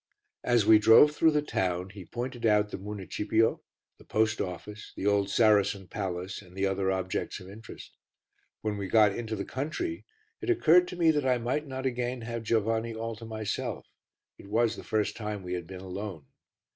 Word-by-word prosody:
As 120 -4 +3
we 110 0 +7
drove 115 +7 +7
through 160 +2 +4
the 150 -1 +1
town, 90 -7 -2
he 95 -3 -10
pointed 120 +4 -5
out 105 -2 +3
the - - -5
municipio, 105 +2 -1 0.4
the - - -15
post 110 +1 +1
office, 95 +3 -7
the - - -5
old 100 -1 +2
Saracen 100 -2 +3
palace, 95 -1 -4
and 90 -2 -17
the 95 - +1
other 95 0 0
objects 95 +1 -2
of 95 - -12
interest. 105 +3 -11 0.7
When 105 -1 -2
we 100 -1 -4
got 105 0 +4
into 115 -2 -4
the 100 - -4
country, 330 - -4 0.4
it - - -4
occurred 180 - +5
to - - -7
me 170 -2 +4
that 145 -3 0
I 125 -1 +3
might 130 +6 -2
not 130 0 -5
again 125 -1 -2
have 115 0 -4
Giovanni 115 +1 0
all 115 0 -4
to 115 - -9
myself, 110 -2 -4 0.5
it - - -12
was 115 +2 +1
the - - -9
first 110 -1 -1
time 105 -3 -5
we 90 0 -4
had 90 -2 -4
been 95 -1 -8
alone. 95 -4 -6
110 Hz, 190 wpm, -29 LUFS, 100-120 Hz, 0.7 s, we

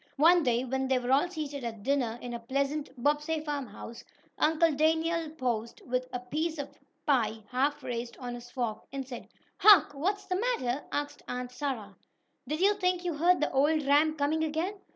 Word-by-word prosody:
One 340 +4 +6
day, 245 -3 +1
when 265 +1 -1
they 260 -1 +3
were 250 0 -2
all 285 +6 +4
seated 295 -5 -5
at 225 -3 -5
dinner 250 -3 0
in 245 - -5
the 235 - -4
pleasant 275 +5 -1
Bobbsey 295 +5 +1
farmhouse, 270 -6 -6 0.4
Uncle 320 +1 +4
Daniel 320 +2 +1
paused, 240 -7 -3
with 255 0 -1
a 250 - -3
piece 310 +6 -2
of 285 -1 -6 0.3
pie 225 -7 +1
half 275 +4 0
raised 235 -1 -4
on 245 -2 -5
his 240 0 -9
fork, 240 -4 -2
and 270 -1 -5
said: 245 -3 -8 0.3
"Hark!" 375 -9 +7
"What's 390 +8 -1
the 365 - -1
matter?" 295 - -1
asked 290 0 -3
Aunt 250 0 -4
Sarah. 250 -7 -4 0.5
"Did 305 +5 -2
you 400 +2 +5
think 365 -1 +1
you 345 - 0
heard 345 +4 +3
the - - +1
old 295 +3 +3
ram 300 +3 +4
coming 305 +2 +1
again?" 320 +5 -1
285 Hz, 185 wpm, -30 LUFS, 250-315 Hz, 0.5 s, Hark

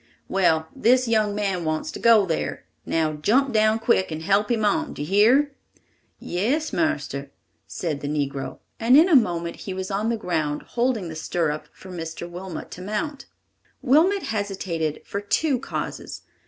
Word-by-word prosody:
"Well, 160 -4 +2
this 255 -1 +3
young 215 -3 +2
man 195 -4 -1
wants 155 -1 -2
to - - -7
go 225 -3 +6
there. 165 -3 -3 0.2
Now 160 -1 +1
jump 245 - +2
down 215 0 +4
quick 225 -4 +2
and 160 0 -5
help 200 +3 +2
him 225 -3 +1
on. 310 +8 +1
Do 145 - -4
you - - -5
hear?" 240 +9 +4 0.7
"Yes, 260 - -1
marster," 140 - -1 0.4
said 155 -5 -3
the 145 - -5
negro, 140 -2 -3 0.2
and 240 +4 +6
in 320 +4 +7
a 345 - +5
moment 170 -8 +2
he 190 - -6
was 190 +1 -4
on 210 +3 0
the 235 - 0
ground, 155 -7 -2
holding 240 -6 0
the 160 - -7
stirrup 155 -2 -2
for 190 - -13
Mr. 165 -1 -6
Wilmot 175 0 -7
to 180 - -8
mount. 215 +9 -4 0.6
Wilmot 335 +9 +4
hesitated 190 -7 -3
for 200 - -4
two 260 +6 +1
causes. - - -5
200 Hz, 170 wpm, -24 LUFS, 165-235 Hz, 0.7 s, in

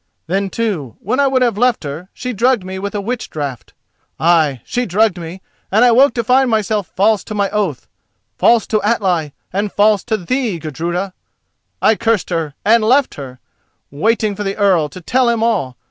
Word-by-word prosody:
Then 195 +4 -1
too, 185 - -3
when 245 +8 -2
I 280 - +4
would 260 -1 +2
have 230 -4 0
left 245 -5 +2
her, 155 +6 -7
she 250 -1 -5
drugged 235 0 +2
me 190 +1 -6
with 200 +1 -5
a 205 - -1
witch 235 +3 -4
draught—ay, 150 +2 -2
she 245 0 -2
drugged 200 0 +2
me, 170 +3 -8 0.3
and 220 +5 +5
I 245 - +5
woke 265 +4 +4
to 235 - 0
find 255 +3 +3
myself 215 -4 -1
false 205 +2 +2
to 215 - -6
my 200 -1 0
oath, 200 - -2 0.5
false 235 -1 +3
to 215 -1 0
Atli, 185 -9 0 0.2
and 200 +1 -1
false 210 0 +3
to 220 -2 0
thee, 220 +1 -2
Gudruda. 170 +5 -4 0.7
I 220 - +6
cursed 225 -4 0
her 160 -4 -2
and 225 +1 +4
I - - 0
left 265 +3 +3
her, 130 -3 -9 0.5
waiting 215 +7 0
for 205 - -4
the 195 -1 -3
Earl, 185 -7 +2
to 185 - -11
tell 250 +7 +2
him 230 -1 0
all. 135 - 0
205 Hz, 190 wpm, -17 LUFS, 175-230 Hz, 0.7 s, I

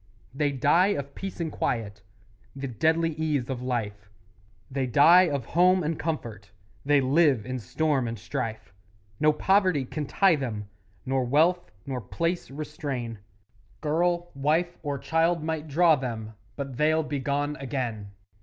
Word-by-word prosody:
They 145 +1 0
die 150 +7 +3
of 140 0 -5
peace 195 -1 -7
and 165 -2 -2
quiet 105 -3 -2 0.5
The 135 0 -4
deadly 160 +7 +1
ease 150 -5 -1
of 125 -2 -4
life; 105 -5 -3 0.6
They 130 -1 -1
die 170 +8 +6
of 140 -5 -2
home 180 +1 +4
and 155 +1 -2
comfort; 120 - -4 0.3
They 145 0 +4
live 135 -4 +3
in 130 0 -4
storm 140 +1 0
and 115 0 -4
strife; 115 -2 -5 0.5
No 155 - +5
poverty 185 -3 +2
can 150 +2 -5
tie 195 +2 +4
them, 110 -7 -4 0.4
Nor 130 -1 0
wealth 160 +8 +2 0.2
nor 130 -2 -4
place 170 - -2
restrain 135 -6 -5 0.6
Girl, 175 +3 0
wife, 160 +5 0
or 145 -2 -3
child 165 +3 +1
might 160 -1 -3
draw 160 +2 +4
them, 115 -5 -5 0.2
But 135 -3 -6
they'll 155 +2 +3
be 150 -2 -3
gone 145 +2 -1
again! 125 -7 -4
145 Hz, 145 wpm, -26 LUFS, 125-160 Hz, 0.6 s, die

